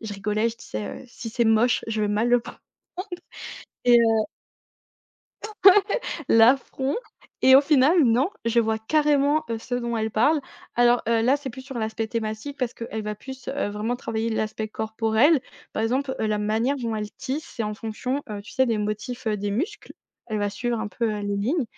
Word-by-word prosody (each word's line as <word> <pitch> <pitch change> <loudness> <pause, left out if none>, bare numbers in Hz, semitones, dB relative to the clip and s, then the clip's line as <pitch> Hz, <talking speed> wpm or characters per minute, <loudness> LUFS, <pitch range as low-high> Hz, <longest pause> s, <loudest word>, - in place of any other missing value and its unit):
je 220 -2 -6
rigolais 210 +3 0
je 230 - -7
disais, 105 - -6
heu: - - -15
«Si 230 0 -8
c'est 235 +2 0
moche, 225 +2 +3
je 220 -1 -1
vais 210 - +1
mal 210 +3 +1
le 245 0 +5
prendre.» 230 - -11 1.3
et 240 -1 +7
heu 225 -2 +3 1.2
Ouais, 430 - -6 0.8
l'affront 265 +3 +3 0.5
et 260 0 +8
au - - +8
final, 295 +3 +4
non, 245 +5 +3 0.2
je 230 0 +3
vois 220 -1 0
carrément, 290 +4 +2
heu, 230 - -2
ce 245 +2 -5
dont 235 -1 -2
elle 220 0 -1
parle. 285 +9 +3 0.3
Alors, 240 0 +4
heu, 230 -1 +3
là, 260 +5 +4
c'est 280 -2 -6
plus 260 +3 -10
sur 260 -2 -7
l'aspect 220 0 -2
thématique 220 +5 -4
parce 250 -4 -2
qu'elle 225 -1 -5
va 210 0 -3
plus, 265 +4 -10
heu, 280 -5 -1
vraiment 215 +4 -2
travailler 225 -1 -3
l'aspect 220 -1 -2
corporel. 220 +7 +2 0.3
Par - - -2
exemple, 260 +4 0
heu, 220 - +1
la 215 0 0
manière 220 +6 0
dont 230 -4 -3
elle 210 -1 -4
tisse, 275 +7 -5
c'est 230 - -1
en 210 0 -2
fonction, 250 +6 -3
heu, 205 -1 -5
tu - - -12
sais, 260 0 +2
des 230 -2 +1
motifs, 215 +4 -4
heu, 215 -1 +1
des 205 +1 -2
muscles. 340 - -3 0.3
Elle 215 -2 -2
va 205 0 0
suivre 235 +3 -2
un 220 -1 -3
peu, 230 +1 -1
heu, 210 - -4
les 205 0 -2
lignes 255 - 0
230 Hz, 200 wpm, -24 LUFS, 220-260 Hz, 1.3 s, et